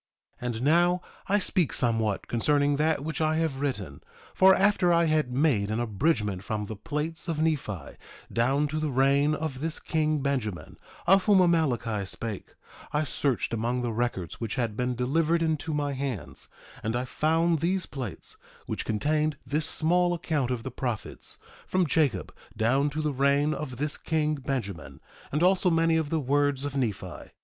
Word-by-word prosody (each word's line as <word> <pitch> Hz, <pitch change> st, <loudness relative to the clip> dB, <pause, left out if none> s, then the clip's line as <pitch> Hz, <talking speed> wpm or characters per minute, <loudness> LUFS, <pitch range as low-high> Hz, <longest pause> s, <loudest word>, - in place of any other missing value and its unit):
1:3 -, -, -5 dB
And 115 Hz, -1 st, -3 dB
now, 175 Hz, +4 st, +4 dB, 0.3 s
I 205 Hz, -, +3 dB
speak 185 Hz, -5 st, +1 dB
somewhat 115 Hz, -4 st, 0 dB
concerning 145 Hz, +4 st, +2 dB
that 155 Hz, -1 st, +1 dB
which 160 Hz, -1 st, -3 dB
I 155 Hz, 0 st, +2 dB
have 160 Hz, -4 st, -1 dB
written; 105 Hz, -, -3 dB, 0.3 s
for 190 Hz, 0 st, +6 dB
after 195 Hz, -2 st, +3 dB
I 170 Hz, 0 st, +4 dB
had 155 Hz, -5 st, +1 dB
made 125 Hz, -7 st, +2 dB
an 110 Hz, +2 st, -1 dB
abridgment 110 Hz, -, 0 dB
from 105 Hz, -1 st, -3 dB
the 110 Hz, -, -6 dB
plates 150 Hz, -, -3 dB
of 165 Hz, -3 st, -2 dB
Nephi, 135 Hz, -, -2 dB, 0.4 s
down 135 Hz, +5 st, +2 dB
to 155 Hz, +1 st, -2 dB
the 155 Hz, -1 st, -1 dB
reign 140 Hz, +3 st, +3 dB
of 155 Hz, -5 st, -4 dB
this 160 Hz, +2 st, -2 dB
king 155 Hz, -3 st, 0 dB
Benjamin, 125 Hz, -10 st, -2 dB, 0.3 s
of 195 Hz, +1 st, +5 dB
whom 205 Hz, -2 st, +5 dB
Amaleki 130 Hz, -, +2 dB
spake, 110 Hz, 0 st, -5 dB, 0.4 s
I 150 Hz, +1 st, +1 dB
searched 135 Hz, -4 st, -1 dB
among 120 Hz, +2 st, -1 dB
the 120 Hz, -, -1 dB
records 115 Hz, -7 st, -3 dB
which 115 Hz, -3 st, -2 dB
had 115 Hz, -5 st, -1 dB
been 125 Hz, +2 st, -1 dB
delivered 160 Hz, +7 st, +1 dB
into 160 Hz, -1 st, -1 dB
my 145 Hz, -1 st, -1 dB
hands, 135 Hz, -5 st, -4 dB, 0.3 s
and 110 Hz, +2 st, -2 dB
I 125 Hz, +1 st, -1 dB
found 160 Hz, +4 st, +1 dB
these 180 Hz, +4 st, 0 dB
plates, 130 Hz, -7 st, -6 dB, 0.3 s
which -, -, -3 dB
contained 150 Hz, +7 st, 0 dB
this 150 Hz, +2 st, -1 dB
small 175 Hz, +2 st, +2 dB
account 150 Hz, -6 st, -1 dB
of 125 Hz, -3 st, -2 dB
the 130 Hz, -, -5 dB
prophets, 120 Hz, -3 st, -4 dB, 0.3 s
from 185 Hz, -1 st, +2 dB
Jacob 150 Hz, -4 st, +1 dB, 0.2 s
down 130 Hz, +6 st, +2 dB
to 155 Hz, +2 st, -3 dB
the 150 Hz, -1 st, 0 dB
reign 140 Hz, +3 st, +2 dB
of 135 Hz, -5 st, -5 dB
this 150 Hz, +2 st, -2 dB
king 155 Hz, -1 st, 0 dB
Benjamin, 125 Hz, -, -4 dB, 0.3 s
and 150 Hz, +4 st, +1 dB
also 185 Hz, 0 st, +4 dB
many 165 Hz, -1 st, +3 dB
of 160 Hz, -2 st, 0 dB
the 160 Hz, -, 0 dB
words 145 Hz, 0 st, +1 dB
of 145 Hz, -1 st, -4 dB
Nephi. 120 Hz, -8 st, -3 dB
145 Hz, 175 wpm, -27 LUFS, 120-160 Hz, 0.4 s, for